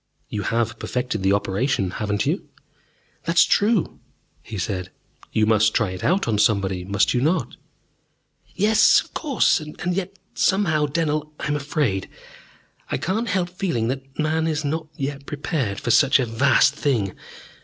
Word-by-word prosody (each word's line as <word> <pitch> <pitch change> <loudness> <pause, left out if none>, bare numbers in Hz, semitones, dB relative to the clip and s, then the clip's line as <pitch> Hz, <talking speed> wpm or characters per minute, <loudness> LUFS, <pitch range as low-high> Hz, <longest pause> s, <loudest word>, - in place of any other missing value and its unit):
"You 105 - -3
have 115 +3 -1
perfected 125 -4 -3
the 95 +1 +3
operation, 100 0 0
haven't 105 -1 -2
you?" - - -2 0.8
"That 165 +1 -1
is - - +8
true," 210 -2 +1 0.4
he 110 - -8
said. 90 -1 -3 0.4
"You 110 - +2
must 110 0 +3
try 105 -5 +1
it 90 0 -7
out 185 -4 +1
on 110 -3 +1
somebody, 95 -4 +1
must 100 +1 +1
you 125 - +1
not?" 155 -3 0 1.0
"Yes, 220 +2 +5
of - - -16
course. 280 - +2
And 155 +4 -4
yet 195 +1 -4 0.2
somehow, 155 -7 +2
Dennell, 150 0 -1
I - - -4
am 150 - +1
afraid. 140 -9 -1 0.8
I - - -1
cannot 220 +6 -2
help 185 -3 0
feeling 170 -12 -1
that 135 +1 -6
man 160 +1 0
is 155 -1 -1
not 155 +2 -2
yet 140 0 -5
prepared 140 - -2
for 120 - -1
such 135 - +5
a 130 - +1
vast 125 +4 +3
thing. 120 -10 0
135 Hz, 160 wpm, -22 LUFS, 105-160 Hz, 1.0 s, is